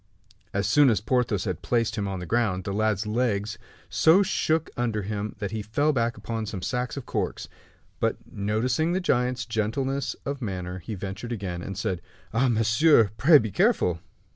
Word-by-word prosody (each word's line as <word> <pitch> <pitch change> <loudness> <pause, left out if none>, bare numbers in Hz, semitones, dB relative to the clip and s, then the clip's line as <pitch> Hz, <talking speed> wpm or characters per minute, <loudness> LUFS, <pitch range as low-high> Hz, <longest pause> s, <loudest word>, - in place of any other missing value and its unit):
As 100 +1 -1
soon 145 +4 +5
as 110 -5 +2
Porthos 110 -3 0
had 90 -5 -3
placed 115 -3 0
him 100 -3 -2
on 95 -1 -3
the 90 - -6
ground, 105 -3 0
the 100 - -3
lad's 110 0 +1
legs 105 -2 -1 0.3
so 175 +5 +5
shook 160 -4 0
under 115 -4 -1
him 105 +1 -4
that 100 -2 -4
he 110 - -3
fell 145 +9 +1
back 115 -3 0
upon 115 -1 -4
some 95 -3 -5
sacks 125 +2 -2
of 140 - -5
corks. - - -3 0.5
But - - +1
noticing 120 +11 0
the 185 - +1
giant's 125 -7 0
gentleness 125 +5 -1
of 140 0 -3
manner, 90 -4 -4
he 105 +5 -6
ventured 95 +5 -6
again, 95 -6 -4
and 100 +1 -6
said: 95 -3 -2 0.3
"Ah, 125 +4 +3
monsieur! 115 +1 +4
pray 150 +8 +7
be 110 -6 -1
careful." 90 -2 +2
110 Hz, 180 wpm, -26 LUFS, 100-125 Hz, 0.5 s, pray